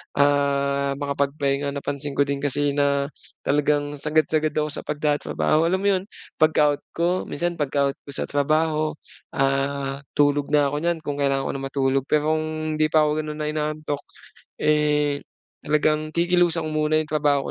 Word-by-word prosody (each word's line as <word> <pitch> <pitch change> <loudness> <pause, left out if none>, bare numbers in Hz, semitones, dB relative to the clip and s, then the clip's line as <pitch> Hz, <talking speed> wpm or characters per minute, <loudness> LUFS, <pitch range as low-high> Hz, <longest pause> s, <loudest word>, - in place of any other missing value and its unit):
ah, 140 -1 +2
makapagpahinga. 140 0 -1
Napansin 145 0 -4
ko 140 - +1
din 140 0 -1
kasi 145 0 0
na 140 -1 +2 0.4
talagang 145 0 +1
sagad-sagad 155 +1 +1
ako 150 0 0
sa 145 - -6
pagtatrabaho. 150 +1 +1
Alam 185 +3 +1
mo 200 - +1
'yon 185 - -6 0.3
pagka-out 150 -2 +3
ko 175 +2 0
minsan, 175 +2 -2
pagka-out 140 -2 0
ko 140 - -9
sa - - -3
trabaho 155 +2 +1 0.4
ah, 135 0 -1 0.2
tulog 145 0 +3
na 145 -1 +4
ko 145 - -3
niyan 170 -1 +1
kung 145 -2 -3
kailangan 135 -1 +1
ko - - -1
na 135 - -5
matulog. 135 -1 0
Pero 155 +1 +3
kung 155 0 -3
hindi 155 0 +2
pa 155 -1 +4
ko 150 - 0
gano'n, 155 0 -4
na 150 - -2
inaantok 155 -1 -3 0.6
eh, 150 -1 +2 0.4
talagang 155 +1 +1
kikilusang 175 -1 +2
ko - - -5
muna 155 - +2
'yong 155 - -7
trabaho 145 -2 +2
145 Hz, 160 wpm, -23 LUFS, 140-155 Hz, 0.6 s, na